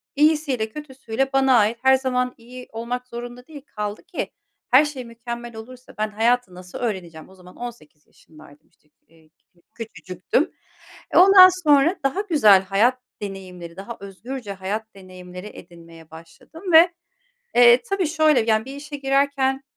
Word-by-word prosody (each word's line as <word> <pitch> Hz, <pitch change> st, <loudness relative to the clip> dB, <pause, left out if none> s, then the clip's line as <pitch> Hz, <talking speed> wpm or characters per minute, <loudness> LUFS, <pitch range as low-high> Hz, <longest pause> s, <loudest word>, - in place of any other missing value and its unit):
İyisiyle 295 Hz, -6 st, +1 dB
kötüsüyle 270 Hz, -1 st, -4 dB
bana 270 Hz, -2 st, +4 dB
ait. 220 Hz, +1 st, +2 dB
Her 265 Hz, 0 st, +5 dB
zaman 250 Hz, -1 st, -1 dB
iyi 250 Hz, +2 st, -12 dB
olmak 245 Hz, +2 st, -5 dB
zorunda 245 Hz, +1 st, -9 dB
değil. 300 Hz, -3 st, -11 dB
Kaldı 210 Hz, -3 st, -6 dB
ki -, -, -5 dB, 0.4 s
her 265 Hz, +5 st, +6 dB
şey 275 Hz, -4 st, -6 dB
mükemmel 235 Hz, 0 st, -8 dB
olursa, 250 Hz, +3 st, -12 dB
ben 215 Hz, 0 st, 0 dB
hayatı 225 Hz, -2 st, 0 dB
nasıl 180 Hz, 0 st, -10 dB
öğreneceğim?" 180 Hz, -9 st, -5 dB
O 190 Hz, -, -17 dB
zaman 180 Hz, -1 st, -16 dB
18 225 Hz, -11 st, -11 dB
yaşındaydım, 155 Hz, -1 st, -19 dB
işte, 150 Hz, -, -37 dB
kü 155 Hz, -, -35 dB
eee, 160 Hz, -1 st, -24 dB, 0.2 s
k 175 Hz, -1 st, -31 dB, 0.2 s
küçücüktüm. 210 Hz, -, -3 dB, 0.6 s
E, -, -, +1 dB
ondan 375 Hz, 0 st, +9 dB
sonra 300 Hz, +4 st, +4 dB
daha 275 Hz, +9 st, 0 dB
güzel 285 Hz, -, +5 dB
hayat 215 Hz, +7 st, +1 dB, 0.2 s
deneyimleri, 185 Hz, -4 st, -8 dB
daha 200 Hz, +5 st, -8 dB
özgürce 205 Hz, +3 st, -8 dB
hayat 205 Hz, +3 st, -5 dB
deneyimleri 185 Hz, 0 st, -11 dB
edinmeye 165 Hz, -4 st, -15 dB
başladım 170 Hz, -, -10 dB
ve, 335 Hz, +2 st, +7 dB, 0.6 s
eee, 240 Hz, 0 st, +7 dB
tabii 395 Hz, -3 st, -1 dB
şöyle, 310 Hz, -4 st, +3 dB
yani, 220 Hz, 0 st, +1 dB
bir 270 Hz, +1 st, -8 dB
işe 290 Hz, +1 st, -8 dB
girerken 275 Hz, -1 st, 0 dB
235 Hz, 150 wpm, -22 LUFS, 190-270 Hz, 0.6 s, ondan